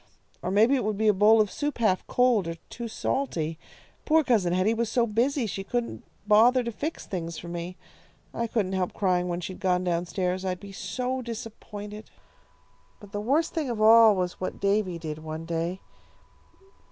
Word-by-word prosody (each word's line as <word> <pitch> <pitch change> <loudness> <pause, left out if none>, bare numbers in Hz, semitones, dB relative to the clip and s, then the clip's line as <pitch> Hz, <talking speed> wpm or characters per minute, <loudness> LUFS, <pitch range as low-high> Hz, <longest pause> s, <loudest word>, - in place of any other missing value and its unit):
Or 175 - -3
maybe 215 +7 +4
it 265 - +1
would 210 -1 -1
be 220 0 +3
a - - +5
bowl 210 +3 +5
of 210 -2 +2
soup 290 -1 -3
half 215 -6 +1
cold, 245 -7 +2
or 165 - -3 0.2
too 235 -1 -5
salty. 165 - -2 0.4
Poor 315 0 +4
Cousin 215 -10 +2
Hetty 185 +5 +2
was 230 -1 -1
so 235 +1 +2
busy 240 +4 +1
she 195 -2 -4
couldn't 240 +3 -3 0.2
bother 235 +4 +5
to 235 - -3
fix 305 +8 -5
things 170 -3 -5
for 170 - -8
me. 175 +1 -5 0.6
I 235 - -2
couldn't 205 -5 -1
help 185 -1 -1
crying 180 -3 +1
when 175 0 -3
she'd 185 +2 -6
gone 180 -1 +1
down 175 -1 -1
stairs. 185 0 -2
I'd 185 -1 -2
be 200 -1 -10
so 255 +6 -3
disappointed. 215 -2 -8 0.9
"But 205 -1 -14
the 205 - -3
worst 285 +9 +1
thing 310 -6 -2
of 235 -3 -3
all 220 0 +7
was 180 -1 -3
what 185 - -4
Davy 200 -3 +1
did 155 -2 -6
one 160 +1 -6
day. 170 +3 -3
205 Hz, 190 wpm, -27 LUFS, 180-235 Hz, 0.9 s, all